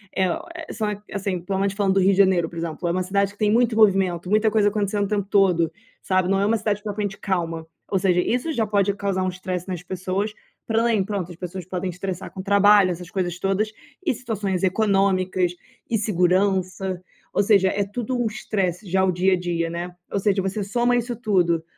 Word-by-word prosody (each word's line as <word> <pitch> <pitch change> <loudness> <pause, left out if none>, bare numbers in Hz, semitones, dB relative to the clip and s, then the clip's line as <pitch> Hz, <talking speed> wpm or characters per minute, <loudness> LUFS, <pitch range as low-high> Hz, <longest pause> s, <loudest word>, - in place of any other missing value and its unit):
eh, 185 -1 +2
ó, 175 - -3
eh, 320 -3 -7
são 210 -2 -3
assim, 195 -3 -2
pelo 190 +2 -2
menos 195 0 +1
falando 195 -2 +1
do - - +4
Rio 190 +2 +5
de 190 - 0
Janeiro, 185 -4 +4
por 170 - -10
exemplo, 165 +1 -3
é - - +1
uma 185 +2 0
cidade 200 +1 0
que - - -25
tem 210 -1 +2
muito 235 0 +3
movimento, 190 -5 +3
muita 215 +1 +3
coisa 205 -1 +3
acontecendo 205 -1 0
o - - -3
tempo 205 -2 -1
todo, 180 -5 +3 0.3
sabe? 185 -1 +1
Não 195 0 +2
é - - +2
uma 225 +2 +2
cidade 210 -1 -2
propriamente 205 -2 -3
calma, 165 -5 -2 0.2
ou 195 - +1
seja, 180 -1 +2
isso 250 - -1
já 230 -5 +1
pode 200 -1 +2
causar 195 -2 -1
um 185 - 0
estresse 185 0 -4
nas 180 -3 -4
pessoas 185 +3 -2 0.4
pra 225 0 +2
além 230 -4 +2
pronto, 190 -3 -4
as 170 - -11
pessoas 180 0 -6
podem 185 +1 -3
estressar 180 +1 -5
com 190 - -7
o - - -10
trabalho, 200 -1 +5
essas 175 0 -7
coisas 180 -3 -2
todas. 195 +3 0 0.3
E - - +2
situações 210 -6 -3
econômicas 190 -2 +2 0.4
e 230 - +2
segurança, 185 -1 +1 0.3
ou - - +3
seja, 195 -2 +4
é 200 +1 0
tudo 240 +5 -3
um - - 0
estresse 200 -4 -2
já 190 +2 +2
o 185 - +2
dia 185 +2 +2
a 185 - +1
dia, 170 -2 -1
né, 175 +1 -5 0.2
ou 200 - 0
seja, 195 0 +1
você 195 +2 -2
soma 240 +4 +1
isso 240 0 -2
tudo, 180 -8 +1
195 Hz, 220 wpm, -23 LUFS, 180-210 Hz, 0.4 s, Rio